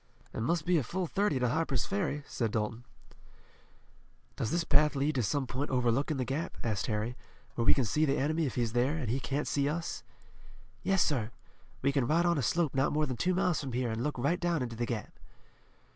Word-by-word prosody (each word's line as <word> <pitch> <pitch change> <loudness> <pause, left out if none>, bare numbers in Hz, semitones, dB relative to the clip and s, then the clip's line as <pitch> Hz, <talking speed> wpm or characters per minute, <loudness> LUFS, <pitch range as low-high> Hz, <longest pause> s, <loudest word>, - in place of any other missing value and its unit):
"And 115 - -2
must 170 -2 +1
be 175 -2 +4
a - - -1
full 180 +10 -2
thirty 195 -3 +1
to 125 -1 +1
Harper's 150 -1 0
Ferry," 185 -7 -1
said 115 -5 -1
Dalton. 115 +2 -2 1.5
"Does 110 - -2
this 170 +5 +1
path 150 0 +4
lead 140 +3 +1
to 130 - +1
some 135 +5 0
point 130 +4 -3
overlooking 130 +3 +1
the 130 - -1
Gap," 140 +7 -3
asked 110 -5 -1
Harry, 110 +2 -1 0.4
"where 115 - -1
we - - +6
can 135 - +1
see 150 +9 +1
the 140 0 +1
enemy 155 +2 +1
if 130 - -5
he's 115 -3 0
there, 130 +6 +2
and 125 -8 -2
he 130 - 0
can't 140 +3 -2
see 140 0 +1
us?" 165 +2 -3 0.8
"Yes, 195 -2 +3
sir. 120 -8 0 0.5
We 140 - +4
can 135 -4 +1
ride 170 +3 +3
on 170 -3 +3
a - - +1
slope 160 +5 +1
not 135 0 +2
more 150 +1 +2
than 130 - -3
two 180 +9 +1
miles 180 -4 +1
from 135 -4 -5
here 125 -1 0
and 110 +1 -2
look 150 0 -2
right 140 +8 +1
down 170 -5 +1
into 120 -2 -5
the 120 +1 -2
Gap." 115 -3 -4
140 Hz, 220 wpm, -31 LUFS, 120-160 Hz, 1.5 s, we